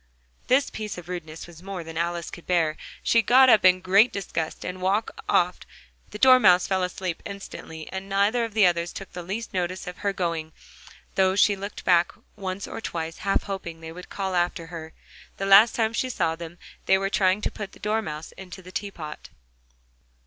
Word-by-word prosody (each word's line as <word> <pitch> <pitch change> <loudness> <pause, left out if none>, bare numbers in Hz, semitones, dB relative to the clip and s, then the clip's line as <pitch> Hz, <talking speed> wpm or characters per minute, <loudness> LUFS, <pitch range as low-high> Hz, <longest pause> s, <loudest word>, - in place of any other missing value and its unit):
This 270 +2 +3
piece 215 -3 -5
of 175 -1 -9
rudeness 165 -3 -6
was 170 -1 -14
more 190 -2 -6
than 165 0 -9
Alice 170 0 -2
could 175 - -11
bear: 165 -4 +2 0.3
she 230 - +4
got 255 +4 +6
up 220 - +6
in 185 0 +5
great 195 +6 +5
disgust, 170 -5 -4
and 185 0 -5
walked 200 +4 +1 0.2
off: - - +2 0.5
the - - -7
Dormouse 250 -8 +6
fell 190 -1 0
asleep 180 -1 -3
instantly, 160 -5 -8
and 190 +1 -6
neither 200 +5 +2
of 225 -2 -5
the 215 -3 +6
others 170 -1 +1
took 195 - -9
the 180 - -5
least 205 +7 -5
notice 185 0 -2
of 180 0 -8
her 200 - 0
going, 165 -4 -3 0.6
though 190 0 +3
she 205 0 +4
looked 200 +1 -7
back 175 -1 +4 0.2
once 195 -1 -5
or - - -6
twice, 165 -4 -4
half 195 +1 +1
hoping 180 -5 -6
that 165 - -11
they 160 - -6
would 180 +2 -11
call 190 -2 -3
after 175 -1 0
her: 160 -1 -7 0.5
the 195 - -2
last 200 +4 +7
time 225 -1 +1
she 255 +2 -1
saw 165 -9 0
them, 170 +1 -9 0.3
they 190 - +5
were 195 +1 -2
trying 190 0 +3
to - - -2
put 205 -2 -7
the - - -15
Dormouse 210 -8 -3
into 190 0 -11
the 185 - -11
teapot. 175 -7 -6
185 Hz, 200 wpm, -25 LUFS, 170-200 Hz, 0.6 s, last